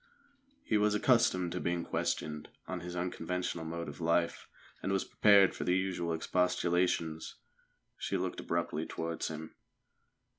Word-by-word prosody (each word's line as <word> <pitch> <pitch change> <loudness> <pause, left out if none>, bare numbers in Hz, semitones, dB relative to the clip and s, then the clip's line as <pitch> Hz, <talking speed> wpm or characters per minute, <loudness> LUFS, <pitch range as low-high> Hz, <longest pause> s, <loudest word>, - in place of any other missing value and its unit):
He 110 - +2
was 105 0 +3
accustomed 105 -7 +3
to 90 - -2
being 85 -1 -1
questioned 75 -1 -2 0.2
on 95 - -3
his 90 +1 -6
unconventional 90 -1 -2
mode 85 +1 -4
of 75 +3 -8
life, 85 +1 +1 0.3
and 95 - -1
was 95 -1 +1
prepared 100 -2 +6
for - - -4
the 90 +1 +2
usual 90 -3 -1
expostulations. 90 -2 0 0.6
She - - -1
looked - - -2
abruptly 85 -2 -2
towards 80 0 -3
him. 80 0 -6
85 Hz, 140 wpm, -32 LUFS, 85-95 Hz, 0.6 s, prepared